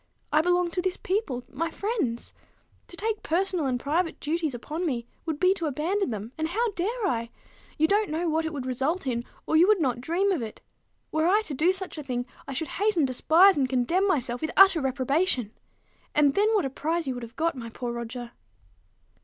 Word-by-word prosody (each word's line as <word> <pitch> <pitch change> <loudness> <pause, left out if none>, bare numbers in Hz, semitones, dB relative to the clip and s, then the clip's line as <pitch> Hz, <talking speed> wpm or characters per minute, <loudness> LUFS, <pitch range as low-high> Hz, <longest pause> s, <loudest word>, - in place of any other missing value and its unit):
I 305 - +5
belong 355 0 +2
to 360 - -1
this 370 0 -1
people, 365 - -2
my 330 +5 -3
friends. 340 - -2 0.5
To 350 - -10
take 435 +1 -1
personal 355 -2 0
and 250 -1 0
private 325 +6 -1
duties 315 -3 -1
upon 305 +8 -5
me, 250 -8 -1 0.2
would 310 -2 -2
be 370 +1 +5
to 335 -5 -3
abandon 325 +7 0
them; 215 0 -5
and 315 - 0
how 450 +7 0
dare 420 +5 -2
I? 230 -10 -1 0.5
You 315 - +4
don't 415 +3 +2
know 325 +3 -1
what 320 0 +1
it 320 - -3
would 280 -4 -5
result 270 +8 -1
in, 240 -2 -1 0.2
or - - 0
you 335 +4 +6
would 425 -2 +4
not 250 -6 0
dream 360 +8 +1
of 355 - 0
it. 220 -2 -6 0.5
Were 315 +1 +2
I 415 +4 +4
to 305 - -6
do 315 +7 +3
such 375 -3 -5
a - - -6
thing, 245 -2 -3 0.2
I 275 - -4
should 305 +5 -3
hate 425 +1 +3
and 310 - +4
despise 330 +9 +5
and 265 -3 +1
condemn 300 +10 +2
myself 250 -9 0
with 315 - -1
utter 385 -4 +7
reprobation. 265 - 0 0.6
And 290 -2 +4
then 415 +2 +3
what 400 - +2
a 270 - -3
prize 320 +3 -2
you 260 - 0
would 245 - -6
have 230 -1 -9
got, 330 +1 +1
my 235 -3 -7
poor 240 +1 -5
Roger!" 235 0 -6
315 Hz, 215 wpm, -27 LUFS, 255-365 Hz, 0.6 s, utter